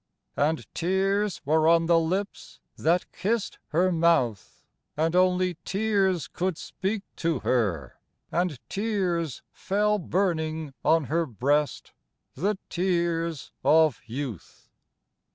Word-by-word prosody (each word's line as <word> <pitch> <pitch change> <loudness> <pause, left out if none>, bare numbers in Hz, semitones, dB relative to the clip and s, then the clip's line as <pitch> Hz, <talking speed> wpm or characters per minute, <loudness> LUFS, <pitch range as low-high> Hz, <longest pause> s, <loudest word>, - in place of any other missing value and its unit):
And 155 +2 0
tears 195 +3 0
were 155 +2 +3
on 165 0 +5
the 165 0 +4
lips 185 +5 -3 0.2
that 170 +3 +1
kissed 210 +5 -2
her 180 +4 +2
mouth, 160 - +1 0.3
And 160 +2 +1
only 180 -1 +2
tears 195 -4 +1
could 180 -2 -2
speak 200 +1 -3
to 165 -6 0
her, 95 - -1 0.3
and 175 -4 0
tears 185 - -1
Fell 210 +2 0
burning 160 -5 -1
on 160 0 +4
her 165 +4 0
breast 140 +6 0 0.4
the 195 +8 -1
tears 170 -3 -1
of 160 -1 +4
youth. 120 - -7
170 Hz, 110 wpm, -26 LUFS, 155-190 Hz, 0.4 s, on